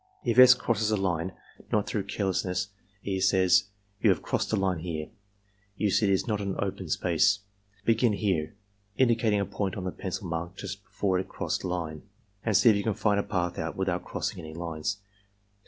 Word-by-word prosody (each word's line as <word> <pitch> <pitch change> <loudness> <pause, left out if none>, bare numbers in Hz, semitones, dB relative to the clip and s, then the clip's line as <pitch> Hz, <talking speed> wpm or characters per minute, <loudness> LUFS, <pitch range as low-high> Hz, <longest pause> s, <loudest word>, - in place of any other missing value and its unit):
If 120 0 +2
S. 125 0 +10
crosses 110 -3 0
a 110 - +2
line, 95 -2 -1 0.4
not 105 -1 +2
through 100 -3 -2
carelessness, 95 -1 -1 0.3
E. 95 -1 -1
says: 95 0 +4 0.4
"You 110 - +5
have 90 -5 +2
crossed - - -1
a - - +3
line 95 -4 0
here. 80 -2 -4 0.7
You 105 -2 +1
see 105 - +3
it - - +3
is 95 - +2
not 105 -2 0
an 100 -1 -2
open 95 -3 -3
space. 90 +5 +2 0.4
Begin 115 0 +3
here 95 -7 -1 0.4
(indicating 115 -4 +3
a 100 - 0
point 100 -1 -3
on 95 - -4
the 90 - -2
pencil 95 +1 -5
mark 85 +2 -4
just 100 0 -6
before 95 -2 0
it 95 - -5
crossed - - -2
the - - -3
line) 85 -4 -3 0.4
and 110 -3 +3
see 120 - +7
if - - +2
you 100 - -1
can 110 -2 0
find 105 -1 +2
a - - +1
path 90 -3 -2
out 80 -2 -3
without 90 -2 -1
crossing - - -3
any 80 0 -8
lines." 85 +4 -3
95 Hz, 200 wpm, -28 LUFS, 90-105 Hz, 0.7 s, S